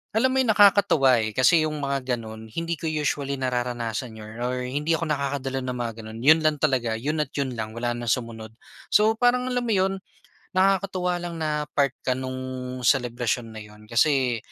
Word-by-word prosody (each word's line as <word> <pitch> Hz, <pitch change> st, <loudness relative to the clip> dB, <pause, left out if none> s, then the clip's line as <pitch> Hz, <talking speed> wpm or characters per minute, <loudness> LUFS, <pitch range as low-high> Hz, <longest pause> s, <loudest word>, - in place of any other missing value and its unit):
alam 260 Hz, +4 st, +3 dB
mo 265 Hz, -, +1 dB
'yon, 260 Hz, -, +2 dB
nakakatuwa, 195 Hz, -, +5 dB
eh, 110 Hz, -1 st, -3 dB
kasi 160 Hz, +6 st, +5 dB
'yong 155 Hz, -, -4 dB
mga 135 Hz, -2 st, -1 dB
gano'n, 110 Hz, -1 st, -9 dB
hindi 165 Hz, +8 st, -4 dB
ko 165 Hz, -, -3 dB
usually 145 Hz, -2 st, -1 dB
nararanasan 120 Hz, -3 st, -3 dB
'yon 110 Hz, +1 st, -10 dB
or 125 Hz, +1 st, -2 dB
hindi 145 Hz, +6 st, 0 dB
ako 165 Hz, -1 st, -2 dB
nakakadalo 140 Hz, -2 st, -2 dB
ng 125 Hz, -1 st, -4 dB
mga 120 Hz, -2 st, -3 dB
gano'n, 110 Hz, 0 st, -8 dB
'yon 155 Hz, +4 st, +7 dB
lang 155 Hz, -1 st, +2 dB
talaga, 130 Hz, -6 st, 0 dB
'yon 150 Hz, +7 st, -2 dB
at 150 Hz, -2 st, -3 dB
'yon 140 Hz, -2 st, -1 dB
lang 110 Hz, -2 st, -5 dB
wala 120 Hz, +1 st, -1 dB
na 120 Hz, 0 st, -5 dB
sumunod. 110 Hz, -2 st, -3 dB, 0.3 s
So, 220 Hz, +1 st, +3 dB
parang, 250 Hz, +1 st, +2 dB
alam 250 Hz, -, +1 dB
mo 225 Hz, -, +1 dB
’yon, 190 Hz, 0 st, +1 dB, 0.5 s
nakakatuwa 185 Hz, -1 st, +1 dB
lang 170 Hz, -2 st, -6 dB
na 150 Hz, -1 st, -1 dB
part 140 Hz, -2 st, +1 dB
ka 130 Hz, -, +2 dB
no'ng 130 Hz, 0 st, -5 dB, 0.5 s
selebrasyon 120 Hz, -1 st, +1 dB
na 110 Hz, -, -10 dB
’yon, 105 Hz, 0 st, -13 dB
kasi 130 Hz, 0 st, +2 dB
135 Hz, 190 wpm, -25 LUFS, 120-165 Hz, 0.5 s, yon